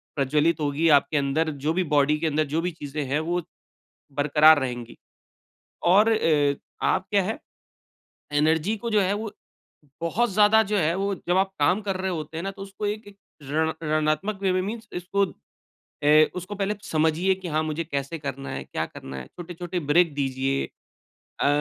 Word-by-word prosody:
प्रज्वलित 150 +4 +2
होगी 150 +3 +1
आपके 145 +1 +4
अंदर 145 +3 +1 0.2
जो 155 - +3
भी 185 +2 +1
बॉडी 145 +1 +4
के 165 - 0
अंदर 155 0 +1
जो 160 - +1
भी 180 +1 -2
चीज़ें 150 -2 -5
है, 140 +3 0
वो 175 +3 -1 0.8
बरक़रार 150 +2 +6
रहेंगी। 120 -3 -5 0.9
और 205 +6 +5
अ, 150 -9 +2 0.3
आप 190 0 +1
क्या 200 -2 +3
है 220 +10 -3 0.9
एनर्जी 160 +7 +2
को 235 +2 -5
जो 215 -1 +3
है, 190 0 +1
वो 215 0 -4 0.7
बहुत 220 +8 +1
ज़्यादा 210 +2 +5
जो 210 - +1
है, 165 -1 +2
वो 200 +1 -1
जब 175 - +3
आप 190 0 +1
काम 180 +8 +3
कर 195 - 0
रहे 190 0 -1
होते 160 -2 -5
हैं 165 - -3
ना, 195 - -2
तो 195 0 -10
उसको 195 +1 -5
एक 210 +1 -3
एक 200 - -15 0.3
रण 155 +3 0
ऋणात्मक 155 +6 0
वे 190 -1 +2
में 185 - +1
मीन्स 220 +3 -5
इसको 195 +3 0 0.8
ए 155 +1 +6
उसको 180 +3 -5
पहले 205 +1 -1
समझिए 160 +2 +1
कि 185 -1 -8
हाँ 155 0 +1
मुझे 155 +1 -2
कैसे 140 0 -4
करना 140 -2 -5
है, 70 0 -4
क्या - - -3
करना 65 0 -9
है? 65 -1 -7
छोटे-छोटे 175 - -6
ब्रेक 170 0 +4
दीजिए। 135 0 -1 0.8
अ, - - +3
165 Hz, 185 wpm, -25 LUFS, 150-195 Hz, 0.9 s, बरक़रार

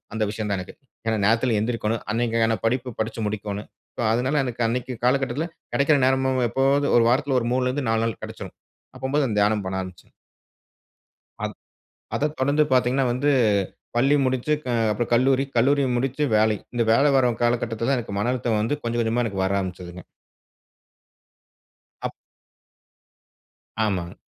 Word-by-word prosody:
அந்த 110 - 0
விஷயம் 105 -1 -4
தான் 100 - 0
எனக்கு. 90 - -9 0.3
ஏன்னா 110 -1 +1
நேரத்தில 115 +2 +2
எழுந்திரிக்கோணும். 110 0 -1
அன்னைக்கான 115 -1 +1
படிப்பு 125 0 -1
படிச்சு 110 +1 -2
முடிக்கோணும். 105 0 -5 0.3
ஸோ - - -2
அதனால 130 +5 +1
எனக்கு 120 -2 -4
அன்னைக்கு 125 +2 -2
காலகட்டத்தில 135 +3 +1 0.3
கிடைக்கிற 140 +2 +3
நேரமும் 130 0 +2
எப்பவாது 135 +4 +2
ஒரு 115 - +5
வாரத்தில 135 +1 +2
ஒரு 115 - -4
3 130 - +1
லருந்து 130 -1 -2
4 115 0 +2
நாள் 115 -3 -4
கடைச்சுரும். - - -8 0.4
அப்போம்போது 135 +1 0
அந்த 105 - -2
தியானம் 105 0 +2
பண்ண 95 0 -2
ஆரம்பிச்சேன். 95 -2 -11 1.3
அத் - - -6 0.6
அத 150 - +1
தொடர்ந்து 145 +3 +3
பார்த்தீங்கன்னா, 130 +1 +2
வந்து 130 +4 +1 0.7
பள்ளி 135 +4 +4
முடிச்சு 130 +3 0
க - - -17 0.3
அப்றோ 105 +3 -1
கல்லூரி, 130 +2 +3
கல்லூரி 140 +4 +3
முடிச்சு 135 +4 -1
வேலை. 110 0 +3 0.2
இந்த 120 - +2
வேல 140 +4 +4
வரும் 125 -3 +2
காலகட்டத்தில 120 -1 0
தான் 135 -2 +2
எனக்கு 100 -4 -5
மன 115 +4 +1
அழுத்தம் 115 -3 0
வந்து 145 +8 -1
கொஞ்சம் 120 0 -1
கொஞ்சமா 115 +2 0 0.2
வர 95 - 0
ஆரம்பிச்சதுங்க. 90 -1 -7 2.0
அப் - - -2 1.7
ஆமாங்க. 90 -5 -2
120 Hz, 150 wpm, -24 LUFS, 110-130 Hz, 2.0 s, ஒரு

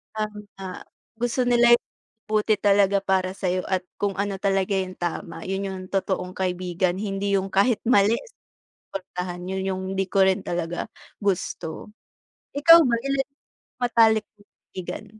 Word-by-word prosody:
tama, 210 -3 -6 0.4
gusto 240 +1 +1
nila 240 -1 +6
yung - - -8 0.4
mabuti 215 0 +2
talaga 200 -1 +3
para 190 -1 0
sa'yo 185 -2 -1
at 185 -1 0 0.2
kung 200 -1 0
ano 200 -1 -2
talaga 195 0 +1
yung 190 -1 -1
tama 175 -1 -4
'yon 195 +1 -2
yung 190 -1 -5
totoong 190 -2 -1
kaibigan, 180 -1 -1
hindi 200 0 -1
yung 195 0 -1
kahit 210 +4 +2
mali 220 -2 +4 0.6
susuportahan. 180 -2 -7
'Yon 190 0 -2
yung 190 0 -3
'di 195 -1 -1
ko 195 -1 +4
rin 190 +1 +2
talaga 175 +3 -3 0.3
gusto. 190 -1 -3 0.6
Ikaw 330 +3 +9
ba, 250 -6 +2
ilan 275 0 +1 0.4
yung - - -75
matalik 225 -2 +4
mong 205 -1 -25 0.2
kaibigan? 185 +3 -6
195 Hz, 145 wpm, -24 LUFS, 185-210 Hz, 0.6 s, Ikaw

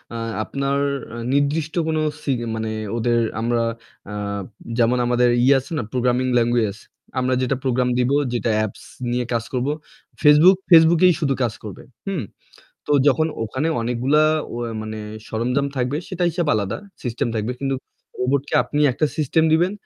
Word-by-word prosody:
আ - - -3 0.3
আপনার 140 +2 -1 0.3
অ্যা 115 - -8 0.2
নির্দিষ্ট 145 +3 0
কোনো 155 -1 0 0.2
সি 140 - -1 0.2
মানে 110 0 -3 0.3
ওদের 120 +1 +2 0.2
আমরা 120 0 +1 0.5
আ - - -6 0.6
যেমন 120 +1 +3
আমাদের 120 0 +3
ইয়ে 135 +2 +6
আছে 130 - -12
না 120 - -1
প্রোগ্রামিং 125 0 +1
ল্যাঙ্গুয়েজ? 115 -3 +1 0.4
আমরা 130 0 +1
যেটা 130 +1 +1
প্রোগ্রাম 125 -1 +1
দিবো, 130 +3 +2 0.2
যেটা 120 -1 0
অ্যাপস 110 -2 -3 0.3
নিয়ে 125 0 0
কাজ 115 -1 0
করবো। 130 +3 0 0.5
Facebook, 155 +5 +7
Facebook 165 -1 +7
এই 180 - +5
শুধু 140 -4 +1
কাজ 115 -2 0
করবে। 105 -3 -8 1.0
তো - - 0
যখন 155 +3 +4 0.2
ওখানে 130 +8 -2
অনেকগুলা 125 +6 +2 0.3
অয়াই 120 -1 -4
মানে 110 0 -6 0.3
সরঞ্জাম 125 +5 0
থাকবে 125 +3 0
সেটা 180 -1 -1
হিসাব 170 -1 -2
আলাদা। 105 0 -1 0.3
সিস্টেম 120 -2 -2
থাকবে। 110 +3 -1
কিন্তু 135 -1 -1 0.5
রোবটকে 140 +4 0
আপনি 150 - -2
একটা 155 +5 +1
সিস্টেম 160 +1 +2
দিবেন। 175 +4 +3
125 Hz, 155 wpm, -21 LUFS, 120-150 Hz, 1.0 s, Facebook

